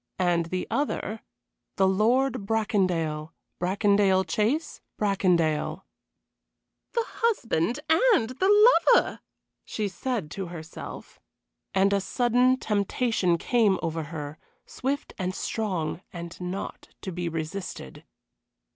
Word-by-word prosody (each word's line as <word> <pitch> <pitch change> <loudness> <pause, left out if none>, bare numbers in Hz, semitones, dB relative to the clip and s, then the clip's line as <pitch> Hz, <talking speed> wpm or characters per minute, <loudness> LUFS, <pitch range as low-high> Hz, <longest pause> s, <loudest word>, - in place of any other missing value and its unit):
and 175 -2 +1
the 185 +1 -2
other: 225 -6 -2 0.5
The 190 - +3
Lord 220 +3 +2
Bracondale, 180 -8 0 0.3
Bracondale 195 +1 +3
Chase, 270 - -1 0.2
Bracondale. 180 -6 +1 1.1
"The 465 - +1
husband 245 - 0
and 320 - +4
the 415 - +6 0.2
lover!" - - +1 0.4
she 215 -2 -3
said 200 -3 -3
to 195 -2 -4
herself. 165 -2 -9 0.6
And 195 +1 +4
a 200 - +2
sudden 245 +4 +2
temptation 205 -4 +1
came 215 0 +2
over 165 -1 -2
her, 150 -1 -7 0.3
swift 275 +2 -3
and 185 0 -2
strong 185 -7 -2
and 170 0 -8
not 180 +2 -5
to 190 - -5
be 175 -1 -3
resisted. 165 - -6
195 Hz, 105 wpm, -26 LUFS, 170-235 Hz, 1.1 s, the